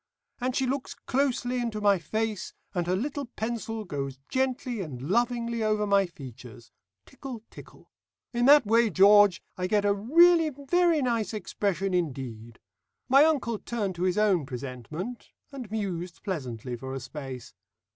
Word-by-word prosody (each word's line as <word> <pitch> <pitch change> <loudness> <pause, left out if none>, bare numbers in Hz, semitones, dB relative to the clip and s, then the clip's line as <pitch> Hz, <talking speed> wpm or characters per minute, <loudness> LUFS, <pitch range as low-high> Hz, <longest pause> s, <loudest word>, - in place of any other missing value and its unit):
And 255 0 -1
she 265 - +1
looks 265 +1 -3
closely 255 -2 -1
into 230 -3 -3
my 200 -2 +3
face, 215 +5 -3 0.2
and 175 -3 -1
her 180 - +2
little 280 +7 -3
pencil 225 -1 -4
goes 140 -5 -4
gently 255 -3 -1
and 145 -9 -6
lovingly 235 - 0
over 215 -1 +1
my 200 -1 +3
features. 125 -7 -12 0.3
Tickle, 250 -5 -9
tickle. - - -14 0.4
In 240 0 +1
that 285 -1 +7
way, 230 +2 +4
George, 200 0 +6 0.2
I 180 - 0
get 205 +1 +1
a 200 - +4
really 325 - +5
very 305 +3 +1
nice 230 -3 -1
expression 195 -2 -2
indeed." 125 -9 -3 0.5
My 275 +3 +7
uncle 255 -9 0
turned 210 -5 -3
to 175 - -8
his 185 +1 +1
own 195 -9 +2
presentment, 135 - -7 0.2
and 260 -6 -8
mused 185 -5 -4
pleasantly 125 - -4
for 130 +2 -6
a - - -3
space. 130 -2 -8
210 Hz, 150 wpm, -27 LUFS, 170-245 Hz, 0.5 s, that